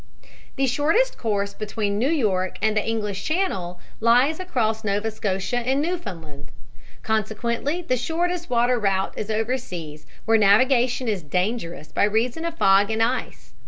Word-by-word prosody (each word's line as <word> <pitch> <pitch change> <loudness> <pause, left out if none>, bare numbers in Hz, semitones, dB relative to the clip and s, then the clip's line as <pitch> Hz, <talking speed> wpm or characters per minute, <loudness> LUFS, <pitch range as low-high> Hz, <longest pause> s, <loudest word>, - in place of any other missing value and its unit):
"The 270 - +1
shortest 315 - +1
course 200 -3 -1
between 210 -1 -2
New 255 +5 +2
York 200 - 0
and 215 -1 +1
the 210 - +2
English 210 -3 -2
Channel 195 - -1 0.2
lies 250 +8 +3
across 230 -11 -1
Nova 210 +2 -1
Scotia 205 +3 -2
and 260 +3 0
Newfoundland. 175 - -5 0.5
Consequently 235 - -1
the 255 -5 0
shortest 340 +6 -2
water 245 0 +2
route 195 -2 0
is 215 - -5
over 225 +4 0
seas 160 -9 -8 0.2
where 225 0 +4
navigation 245 +4 +3
is 205 -4 -1
dangerous 175 0 -3
by - - +2
reason 235 +9 0
of 335 -1 -4
fog 195 -2 +4
and 225 0 +1
ice. 250 +3 -3
225 Hz, 150 wpm, -23 LUFS, 200-260 Hz, 0.5 s, where